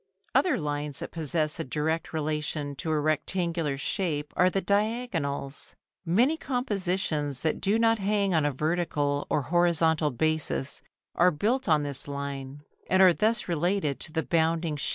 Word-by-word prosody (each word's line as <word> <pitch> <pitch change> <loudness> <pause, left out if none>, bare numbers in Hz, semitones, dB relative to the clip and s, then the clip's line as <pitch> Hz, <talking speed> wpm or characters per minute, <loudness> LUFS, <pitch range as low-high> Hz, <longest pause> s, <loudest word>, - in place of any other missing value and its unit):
Other 365 - +3
lines 145 -1 -3
that 170 - -6
possess 155 -1 -1
a - - -1
direct 160 +4 -2
relation 150 -2 -2
to 165 - -4
a 155 -1 +2
rectangular 155 0 -1
shape 150 -1 -2
are 180 - +4
the 195 - 0
diagonals. 200 - -2 0.3
Many 245 - +3
compositions 185 - -1
that 160 - 0
do 205 +3 +2
not 225 -1 +3
hang 200 -1 +1
on 160 -2 +3
a 145 - +1
vertical 150 -1 -1
or 150 - +1
horizontal 165 -1 +2
basis 150 0 -1 0.3
are 180 +1 +5
built 210 - 0
on 155 -2 +4
this 140 -1 -3
line, 140 0 -5 0.3
and 190 - +3
are 185 -2 +7
thus 220 +4 +1
related 170 -3 0
to - - -6
the 160 0 -1
bounding 165 -1 +1
shape. 145 - -2
160 Hz, 155 wpm, -27 LUFS, 145-185 Hz, 0.3 s, are